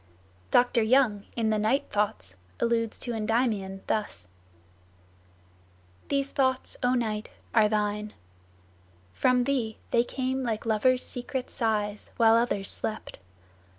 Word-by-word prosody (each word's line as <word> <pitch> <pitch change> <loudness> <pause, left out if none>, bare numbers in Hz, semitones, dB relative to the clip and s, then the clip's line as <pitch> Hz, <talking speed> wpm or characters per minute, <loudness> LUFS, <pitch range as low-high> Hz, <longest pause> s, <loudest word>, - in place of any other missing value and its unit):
Dr. 245 -1 +4
Young, 220 -3 +3
in 225 -2 +1
the 215 - +1
"Night 225 +7 +1
Thoughts," 95 - 0 0.2
alludes 230 -1 0
to 240 - -4
Endymion 215 -4 -1
thus: 205 - -2 0.9
"... 90 0 -32
These 275 0 0
thoughts, 260 -1 0
O 250 0 +2
night, 215 -3 -2 0.2
are 215 -2 +5
thine; 210 0 -1 1.0
From 250 - +3
thee 245 -5 -1
they 235 - +4
came 260 +1 -2
like 230 -4 -2
lovers' 250 +3 +2
secret 250 +1 -4
sighs, 210 -3 -1
While 225 -1 +6
others 230 -4 +1
slept. 215 - -5
220 Hz, 120 wpm, -27 LUFS, 205-245 Hz, 1.0 s, While